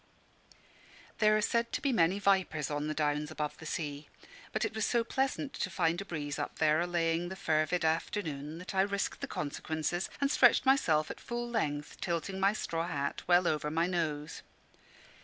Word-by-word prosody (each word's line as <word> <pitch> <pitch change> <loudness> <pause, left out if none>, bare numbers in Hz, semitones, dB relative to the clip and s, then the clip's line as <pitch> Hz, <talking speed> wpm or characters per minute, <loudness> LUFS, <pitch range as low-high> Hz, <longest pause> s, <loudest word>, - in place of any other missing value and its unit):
There 215 0 +5
are - - +1
said 235 +1 +1
to - - 0
be 275 - +1
many 180 -2 +3
vipers 190 -7 +1
on 145 +1 -1
the 155 - -2
Downs 150 0 0
above 150 -1 -3
the 160 - -8
sea; 150 -2 -4 0.4
but - - 0
it - - -3
was 220 0 -2
so 235 +1 +2
pleasant 270 +3 -1
to 190 - -2
find 170 -1 +1
a - - -7
breeze 145 -6 -4
up - - -4
there 155 0 +3
allaying 170 0 0
the 190 - -5
fervid 160 0 +1
afternoon, 160 -2 -2
that 180 +3 -7
I 190 - +3
risked 200 0 -1
the - - -3
consequences 155 +4 -2
and 280 +1 +1
stretched 245 -1 +5
myself 160 - +3
at - - -9
full 240 0 -4
length, 150 -11 -2
tilting 175 +3 -2
my 195 +1 +4
straw 165 -5 -2
hat 140 -2 -2
well 175 0 +5
over 150 -1 0
my 165 +2 +1
nose. 155 -4 -2
170 Hz, 185 wpm, -32 LUFS, 155-200 Hz, 0.4 s, There